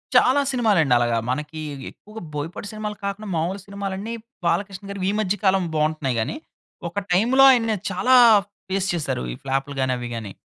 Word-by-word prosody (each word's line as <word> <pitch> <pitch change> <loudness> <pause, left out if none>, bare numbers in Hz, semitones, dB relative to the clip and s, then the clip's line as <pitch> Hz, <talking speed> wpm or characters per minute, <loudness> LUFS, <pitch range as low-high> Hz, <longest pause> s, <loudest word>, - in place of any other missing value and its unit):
చాలా 270 +3 +5
సినిమాలండి. 205 - +3
అలాగా 120 -1 +1
మనకి 150 +3 -4 0.3
ఎక్కువగా 215 +1 -12
బోయపాటి 155 +7 -5
సినిమాలు 215 -1 -5
కాకుండా, 200 +2 -4
మామూలు 180 +5 -1
సినిమాలన్నీ 200 +2 -5 0.3
బాలకృష్ణగారు 195 +1 -2
ఈ - - +2
మధ్య 205 -2 +1
కాలం 190 -2 +3
బాగుంటున్నాయి 150 -5 0
గాని, 290 - -3 0.5
ఒక 175 - -14
టైమ్‌లో 240 +9 +4
ఆయన్ని 225 -3 +2 0.2
చాలా 255 +1 +3 0.5
ఫేస్ 195 0 0
చేసారు 150 - -2
ఈ - - -7
ఫ్లాప్‌లు 135 +1 -2
గాని, 130 -1 +1
అవి 120 -1 -5
గాని. 105 -4 -6
190 Hz, 155 wpm, -23 LUFS, 150-210 Hz, 0.5 s, చాలా